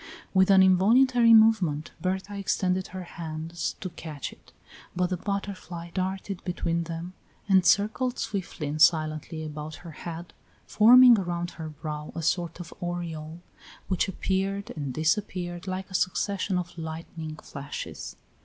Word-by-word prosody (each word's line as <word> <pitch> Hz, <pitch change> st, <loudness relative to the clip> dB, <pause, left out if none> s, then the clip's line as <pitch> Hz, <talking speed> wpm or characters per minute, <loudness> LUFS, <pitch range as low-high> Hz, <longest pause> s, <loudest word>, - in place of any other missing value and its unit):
With 190 Hz, 0 st, +4 dB
an 190 Hz, -1 st, +7 dB
involuntary 230 Hz, +6 st, +5 dB
movement 200 Hz, -9 st, +5 dB
Berta 190 Hz, +2 st, -2 dB
extended 185 Hz, -1 st, 0 dB
her 185 Hz, 0 st, -7 dB
hands 165 Hz, 0 st, -5 dB
to 185 Hz, -, -4 dB
catch 155 Hz, -4 st, -7 dB
it, -, -, -22 dB, 0.4 s
but 180 Hz, 0 st, 0 dB
the -, -, +1 dB
butterfly 185 Hz, -3 st, -5 dB
darted 190 Hz, +1 st, -3 dB
between 170 Hz, -1 st, -1 dB
them, 170 Hz, +2 st, -6 dB, 0.3 s
and 190 Hz, -2 st, +5 dB
circled 220 Hz, +7 st, +2 dB
swiftly 195 Hz, -8 st, -4 dB
and 150 Hz, +2 st, -3 dB
silently 155 Hz, 0 st, +2 dB
about 155 Hz, +1 st, -6 dB
her 170 Hz, -, -7 dB
head, 170 Hz, +2 st, -8 dB, 0.3 s
forming 240 Hz, +1 st, +8 dB
around 175 Hz, -1 st, -3 dB
her 160 Hz, -2 st, -7 dB
brow 150 Hz, 0 st, -6 dB
a 165 Hz, -, -4 dB
sort 170 Hz, +1 st, -1 dB
of 175 Hz, -, -8 dB
aureole, 170 Hz, -2 st, -5 dB, 0.5 s
which 185 Hz, 0 st, +1 dB
appeared 195 Hz, +1 st, -2 dB
and 145 Hz, -4 st, -3 dB
disappeared 175 Hz, -, -1 dB
like 190 Hz, +1 st, -4 dB
a -, -, -10 dB
succession 190 Hz, +1 st, 0 dB
of 175 Hz, -1 st, -5 dB
lightning 160 Hz, -1 st, -6 dB
flashes. 140 Hz, -2 st, -7 dB
175 Hz, 140 wpm, -27 LUFS, 160-195 Hz, 0.5 s, forming